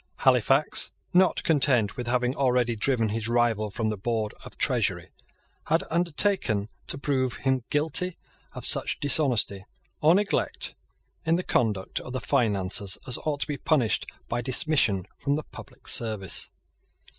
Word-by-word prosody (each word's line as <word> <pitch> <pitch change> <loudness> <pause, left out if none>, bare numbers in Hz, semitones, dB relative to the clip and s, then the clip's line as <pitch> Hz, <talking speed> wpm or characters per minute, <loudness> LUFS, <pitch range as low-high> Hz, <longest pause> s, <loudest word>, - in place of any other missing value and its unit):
Halifax, 135 +3 +3 0.2
not 185 +1 +3
content 135 - +2
with 125 -3 -5
having 125 +1 0
already 125 -3 +1
driven 115 0 +1
his 110 +1 -2
rival 115 -3 +1
from 110 +2 -2
the 105 - -3
Board 110 +1 -2
of - - -11
Treasury, - - +1 0.6
had 165 +2 +2
undertaken 165 - 0 0.2
to - - -1
prove 130 -3 -1
him 130 -2 -1
guilty 160 +4 +1 0.4
of - - -6
such - - +2
dishonesty 125 -9 +2 0.4
or 160 +3 +5
neglect 205 +1 -1 0.5
in 165 0 +2
the 180 - -2
conduct 105 - 0
of 125 - -9
the 130 - -2
finances 100 -7 +1
as 125 - 0
ought 145 -2 -1
to - - +1
be 145 -2 -3
punished 125 -6 +1 0.2
by 120 +1 -2
dismission 120 - +1
from 140 0 0
the 155 - -3
public 130 -2 -14
service. 105 -5 +2
125 Hz, 145 wpm, -26 LUFS, 110-145 Hz, 0.6 s, or